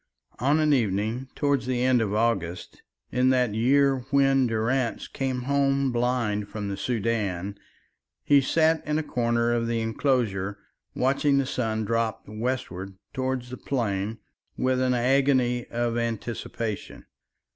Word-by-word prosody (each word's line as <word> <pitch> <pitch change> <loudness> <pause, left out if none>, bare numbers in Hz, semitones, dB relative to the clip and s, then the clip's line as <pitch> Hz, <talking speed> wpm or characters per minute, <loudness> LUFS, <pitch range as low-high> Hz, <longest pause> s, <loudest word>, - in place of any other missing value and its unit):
On 145 +5 +3
an 155 -1 +3
evening 110 +1 0
towards 140 -3 0
the 125 -1 0
end 130 -2 +4
of 105 -3 -1
August, 105 -6 -1 0.3
in 125 +1 +3
that 125 -4 +2
year 135 +4 +3
when 135 -2 +4
Durrance 115 +2 -1
came 130 -2 -3
home 140 0 +1
blind 120 -4 0
from 105 -1 -4
the 100 - -2
Soudan, 100 -5 -2 0.7
he 140 -1 +5
sat 160 +3 +2
in 150 0 +1
a 155 - 0
corner 120 -3 +1
of 115 -1 0
the 115 0 0
enclosure 110 -4 0 0.4
watching 140 +2 +2
the 140 - +2
sun 110 -4 -1
drop 115 0 -1
westwards 105 -4 -4 0.2
towards 130 -1 -2
the 125 - -6
plain 110 -5 -2 0.4
with 130 0 +1
an 130 -1 +2
agony 125 -1 +2
of 120 0 -1
anticipation. 115 -1 -4
120 Hz, 135 wpm, -26 LUFS, 110-130 Hz, 0.7 s, he